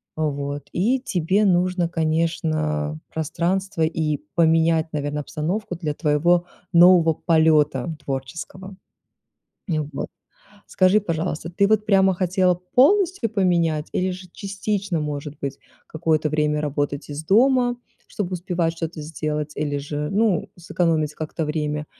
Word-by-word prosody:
Вот, 145 -2 -3
и 230 +9 +2
тебе 195 -3 +1
нужно, 180 -1 +2
конечно, 155 -2 -1
пространство 175 +3 -1
и 155 -2 0 0.2
поменять, 165 -1 +3
наверно, 145 0 -2
обстановку 175 +7 -3
для 160 -3 -3
твоего 170 +4 +2 0.3
нового 170 -1 +7
полета 155 -3 +2
творческого. 170 +8 -6 0.9
И 160 -3 0
вот. 150 -2 -4 0.6
Скажи, 185 +3 +3
пожалуйста, 165 -3 -3
ты 200 +3 +2
вот 215 0 +2
прямо 190 -2 +4
хотела 180 0 +2
полностью 265 - +2
поменять 170 -7 +1
или 185 +1 0
же 185 0 -8
частично, 200 -2 -3
может 150 0 -5
быть, 140 0 -4 0.3
какое-то 155 -1 0
время 150 0 +1
работать 145 0 -2
из 145 +1 -5
дома, 245 - +3 0.3
чтобы 190 -3 -4
успевать 175 -2 -1
что-то 165 -1 -5
сделать, 150 -1 -3
или 145 -1 -1
же, 145 +1 -4
ну, 205 -3 +1
сэкономить 165 -3 0
как-то 155 +1 -4
время? 150 0 -2
165 Hz, 125 wpm, -22 LUFS, 150-185 Hz, 0.9 s, нового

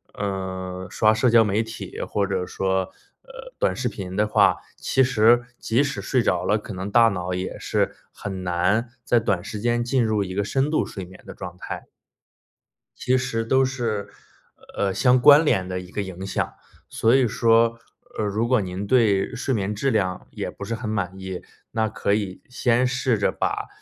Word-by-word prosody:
呃， 95 -2 -4
刷 110 +4 +3
社 120 +3 +2
交 115 0 +6
媒 105 +2 +1
体， 115 0 -7
或 100 -1 -1
者 95 -2 -1
说， 95 0 -1 0.3
呃， - - -12
短 - - +1
视 - - -2
频 95 -2 -6
的 105 +1 +2
话， - - +4 0.2
其 130 - +1
实 120 0 +4
即 120 +4 +1
使 140 -8 -2
睡 125 +5 +1
着 90 -6 +1
了， 105 - +2
可 105 - -8
能 95 +2 -5
大 115 +2 +6
脑 90 -4 -2
也 90 +1 -4
是 - - -1 0.2
很 95 -2 -6
难 90 +7 +1 0.2
在 120 - +3
短 100 -5 0
时 105 +3 -6
间 120 0 +1
进 125 +1 +1
入 110 -2 +1
一 95 -1 -4
个 100 - +1
深 135 +8 0
度 155 - +1
睡 95 -3 -7
眠 95 +1 -15
的 - - -9
状 90 -1 -8
态。 - - -7 1.1
其 130 +1 +2
实 125 -3 -1
都 130 +3 +3
是， 120 -6 -2 0.7
呃， 100 -1 0
相 125 +4 +4
关 145 +5 +8
联 95 - +1
的 90 0 -3
一 90 0 -11
个 105 - -2
影 95 -1 -6
响。 95 - -2 0.4
所 115 +1 +2
以 130 -2 +4
说， 115 0 +3 0.4
呃， 110 - 0
如 105 +3 0
果 125 -3 +3
您 95 +2 -4
对 105 -2 +2
睡 130 +2 -1
眠 105 -2 -1
质 125 +7 0
量 95 -5 -1
也 - - -4
不 - - -9
是 115 - -3
很 110 -1 -5
满 95 -3 -2
意， 95 -1 -6 0.3
那 110 -1 0
可 100 -1 -1
以 100 -3 -2
先 125 0 +2
试 125 -2 +1
着 100 - +1
把， - - -2
105 Hz, 210 characters per minute, -23 LUFS, 95-120 Hz, 1.1 s, 关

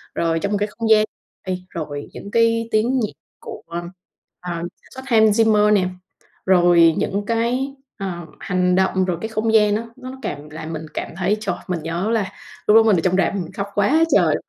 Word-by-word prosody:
rồi 165 -1 +1
trong 200 +5 -2
một 205 - +1
cái 210 - 0
không 225 -1 -1
gian 215 -1 +6 0.4
ê 185 -1 -2
rồi 145 -3 -6
những 200 - -9
cái 230 0 +2
tiếng 240 +5 +2
nhạc 215 - -1 0.3
của, - - -9 0.8
à, 170 -1 -4 0.2
sản - - -22
xuất 260 - -7
Hans 220 -2 +4
Zimmer 210 -1 +4
nè, 185 -3 +3 0.6
rồi 175 -3 +5
những 205 +1 -1
cái, 245 +5 -1 0.2
ờ, 175 -4 -5
hành 180 -1 +1
động, 190 0 +2
rồi 175 -3 -1
cái 220 - -2
không 220 +1 -1
gian 210 -1 +5
á, 230 +2 -3
nó 260 0 -8
cảm 145 +1 -5
làm 160 +1 -7
mình 160 0 -5
cảm - - -4
thấy, 195 +3 +1
trời, 220 - -2
mình 170 -4 -3
nhớ 170 +6 -2
là 215 -4 0 0.4
lúc 210 - +6
đó 225 - +8
mình 215 -5 +4
ở - - +2
trong 185 0 +2
rạp 195 - +1
mình 180 -2 -4
khóc 200 +1 -3
quá 270 +11 +3
trời. - - +4
200 Hz, 205 wpm, -21 LUFS, 175-225 Hz, 0.8 s, đó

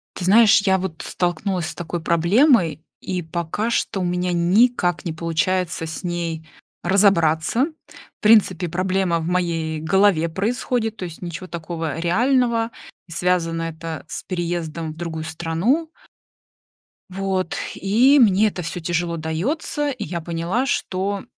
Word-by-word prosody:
Ты 180 - -4
знаешь, 215 +1 +6
я 190 -1 +3
вот 185 -4 -5
столкнулась 175 0 -1
с - - -5
такой 175 0 -4
проблемой, 170 - +3 0.2
и 185 -1 -3
пока 170 +6 -3
что 215 -4 -1
у - - -1
меня 180 0 -1
никак 180 +1 +2
не 165 - -2
получается 165 +2 -1
с 160 +4 -6
ней 170 -2 -3 0.4
разобраться. 190 - +3 0.5
В - - -72
принципе, 195 -5 +4
проблема 185 0 0
в 160 - -4
моей 165 -3 -1
голове 175 0 +3
происходит, 225 +4 -1
то 185 - -4
есть 170 -2 -9
ничего 175 +1 -6
такого 165 -2 -4
реального. 235 +5 +2 0.4
И - - -15
связано 170 -1 0
это 165 -1 -6
с - - -5
переездом 170 -3 -3
в - - -18
другую 160 -2 -4
страну. 170 - -1 1.2
Вот. 190 -1 -2 0.2
И 245 +9 +4
мне 215 -2 +5
это 185 -3 -4
всё 165 +2 -4
тяжело 170 0 -2
дается. 250 - -2
И 250 -5 -5
я 170 -2 -4
поняла, 170 +9 -1
что 195 -5 -2
175 Hz, 140 wpm, -22 LUFS, 165-200 Hz, 1.2 s, знаешь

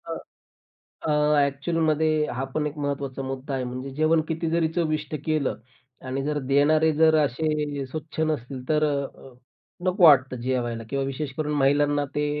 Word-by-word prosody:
हां. - - -3 0.9
अ, 155 - 0 0.3
ॲक्चुअलमध्ये 155 +2 +1
हा 125 +2 -3
पण 150 -1 0
एक 150 +1 -8
महत्त्वाचा 140 -2 -3
मुद्दा 135 +1 -5
आहे 130 - -2
म्हणजे 130 +2 -5
जेवण 155 +2 +3
किती 165 0 -1
जरी 165 0 +2
चविष्ट 155 -3 -1
केलं 150 -9 0 0.5
आणि 135 +1 -2
जर 150 0 -1
देणारे 155 +3 +4
जर 160 +1 +4
असे 150 0 -2
स्वच्छ 155 +3 -7
नसतील 140 -4 -2
तर 155 0 +3
अ, 140 -2 -4 0.5
नको 185 +1 +1
वाटतं 135 -5 +6
जेवायला 120 -2 -2
किंवा 135 +1 -1
विशेषकरून 150 +2 -3
महिलांना 145 +1 +2
ते 150 0 +1
145 Hz, 150 wpm, -25 LUFS, 135-155 Hz, 0.9 s, वाटतं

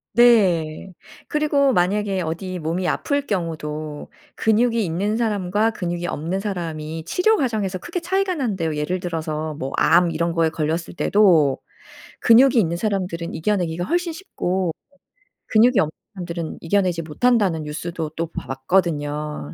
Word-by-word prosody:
네. 190 -8 +3 0.3
그리고 290 -3 +2
만약에 195 +1 +1
어디 175 +3 -4
몸이 170 +3 -2
아플 285 -1 -1
경우도 155 - -4 0.2
근육이 230 0 +2
있는 195 +6 -1
사람과 210 -1 +1
근육이 175 -3 -3
없는 170 +4 -2
사람이 165 -5 -4
치료 435 - +3
과정에서 215 - -1
크게 345 - -4
차이가 380 +2 0
난대요. 190 - -1
예를 150 +5 -1
들어서 155 -3 -3
뭐 135 -2 -5
"암 175 -1 +4
이런 170 +1 -1
거에 165 -1 +2
걸렸을 160 +2 -2
때도 170 -10 +4 0.6
근육이 255 +3 +6
있는 170 -4 +1
사람들은 180 -4 -2
이겨 205 +6 +1
내기가 175 -1 -2
훨씬 350 - 0
쉽고 190 - -2 0.7
근육이 230 0 +4
없는 155 - -1 0.2
사람들은 170 -3 -5
이겨 185 +5 +2
내지 180 -3 0
못한다."는 180 0 +1
뉴스도 160 +1 -5
또 165 0 -2
봐 - - -6
봤거든요. 150 - -1
180 Hz, 325 characters per minute, -22 LUFS, 160-215 Hz, 0.7 s, 근육이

